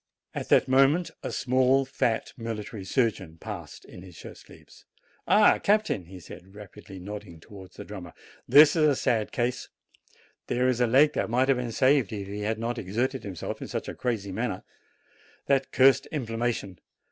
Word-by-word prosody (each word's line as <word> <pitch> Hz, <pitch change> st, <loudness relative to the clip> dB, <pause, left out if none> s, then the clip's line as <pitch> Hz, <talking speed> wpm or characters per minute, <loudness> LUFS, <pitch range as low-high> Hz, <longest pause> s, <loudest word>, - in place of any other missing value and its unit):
At -, -, -5 dB
that -, -, +4 dB
moment 140 Hz, +6 st, +3 dB
a -, -, -5 dB
small, 130 Hz, +1 st, +2 dB
fat, 115 Hz, -3 st, -1 dB
military 110 Hz, -3 st, -6 dB
surgeon 95 Hz, -6 st, -1 dB
passed, -, -, -9 dB
in 90 Hz, -, -12 dB
his 90 Hz, -3 st, -13 dB
shirt -, -, -11 dB
sleeves. -, -, -17 dB, 0.4 s
"Ah, 210 Hz, 0 st, +5 dB
captain," 205 Hz, -, +1 dB
he 95 Hz, +2 st, -11 dB
said, 90 Hz, +3 st, -13 dB
rapidly, 105 Hz, -1 st, -12 dB
nodding 95 Hz, -2 st, -9 dB
towards 95 Hz, +2 st, -14 dB
the -, -, -9 dB
drummer, 95 Hz, -5 st, -9 dB, 0.3 s
"this 145 Hz, 0 st, +7 dB
is 155 Hz, -2 st, +4 dB
a 145 Hz, -, +3 dB
sad 110 Hz, -2 st, 0 dB
case; 125 Hz, +1 st, -2 dB, 0.8 s
there 125 Hz, +1 st, +1 dB
is 125 Hz, -1 st, 0 dB
a 120 Hz, -, +3 dB
leg 135 Hz, +6 st, +4 dB
that -, -, -2 dB
might 125 Hz, +3 st, +1 dB
have 135 Hz, -, +4 dB
been 125 Hz, -2 st, -3 dB
saved 130 Hz, -2 st, +2 dB
if 100 Hz, -2 st, -5 dB
he 100 Hz, +1 st, -6 dB
had 110 Hz, +2 st, -2 dB
not 115 Hz, +2 st, -3 dB
exerted 120 Hz, +8 st, -2 dB
himself 95 Hz, -5 st, -6 dB
in -, -, -5 dB
such -, -, -5 dB
a -, -, -5 dB
crazy 110 Hz, -6 st, -3 dB
manner 105 Hz, -1 st, -3 dB, 0.8 s
that 135 Hz, -1 st, +1 dB
cursed 135 Hz, +1 st, +4 dB
inflammation 115 Hz, -, -3 dB
115 Hz, 175 wpm, -27 LUFS, 100-130 Hz, 0.8 s, this